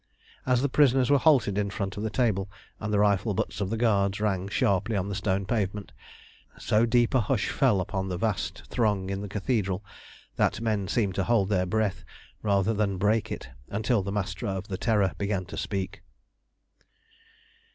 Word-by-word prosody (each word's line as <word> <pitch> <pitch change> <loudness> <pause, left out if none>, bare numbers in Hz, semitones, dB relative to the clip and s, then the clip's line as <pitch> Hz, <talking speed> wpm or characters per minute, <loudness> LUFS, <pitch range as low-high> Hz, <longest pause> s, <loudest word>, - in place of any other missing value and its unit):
As 125 0 +3
the - - +3
prisoners 135 -1 +3
were 140 - +5
halted 125 -10 +3
in 100 -1 0
front 100 -1 -4
of 105 - -5
the 110 - -1
table, 105 -4 0 0.3
and 110 -1 -3
the 105 - +2
rifle 100 0 +2
butts 100 - -2
of 95 - -1
the 115 - -1
guards 100 -4 +2
rang 100 -3 0
sharply 100 +2 +1
on 100 0 -1
the - - -3
stone 100 -1 -1
pavement, 100 -1 -2 0.7
so 110 +2 +2
deep 120 +2 +3
a 130 - +4
hush 105 0 0
fell 125 -8 +3
upon 95 0 -3
the 90 - -2
vast 95 -2 -2
throng 105 -5 0
in 100 0 -3
the 105 - -5
Cathedral, 100 -2 -1 0.5
that - - +1
men 110 -4 -1
seemed 100 -1 0
to 95 - 0
hold 110 -5 +2
their 90 -3 +1
breath 100 -1 -1 0.4
rather 100 0 +2
than 100 -2 0
break 110 +3 +1
it - - -6 0.2
until 110 +2 +1
the 100 +1 -4
Master 105 +3 -3
of 95 0 -4
the 95 - -2
Terror 105 -5 +2
began 100 -2 -1
to - - -8
speak. 95 -2 -4
100 Hz, 185 wpm, -27 LUFS, 95-110 Hz, 0.7 s, were